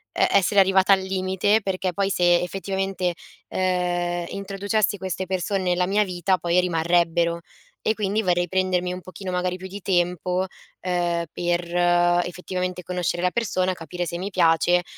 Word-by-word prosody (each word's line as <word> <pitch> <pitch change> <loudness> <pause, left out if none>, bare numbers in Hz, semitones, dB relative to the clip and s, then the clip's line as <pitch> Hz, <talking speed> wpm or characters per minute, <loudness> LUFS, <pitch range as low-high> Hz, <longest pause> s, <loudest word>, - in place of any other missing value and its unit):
e - - +3
essere 200 +1 +3
arrivata 190 0 +5
al 195 - +3
limite, 190 +3 +1
perché 190 -1 -1
poi 195 +2 -1
se, 175 -2 +4
effettivamente, 190 -1 -2 0.3
ehm, 175 -1 -1
introducessi 200 +2 -1
queste 190 0 -3
perso 185 +1 -1
nella 180 -1 +1
mia 205 +2 +3
vita 185 -1 0
poi 175 +1 +1
rimarrebbero; 170 -1 +1 0.4
e 220 - +1
quindi 210 0 0
vorrei 175 -3 +1
prendermi 180 0 0
un 180 - -7
pochino, 185 +1 -7
magari, 180 0 -1
più 185 - -10
di 200 +2 -8
tempo, 180 0 0 0.4
ehm, 175 -2 0
per 175 0 0 0.6
effettivamente 180 0 -4
conoscere 175 0 -2
la 180 - +2
persona, 185 -5 0
capire 175 +1 -5
se 170 0 -4
mi 190 +2 -3
piace 175 -1 +3
180 Hz, 150 wpm, -24 LUFS, 175-190 Hz, 0.6 s, arrivata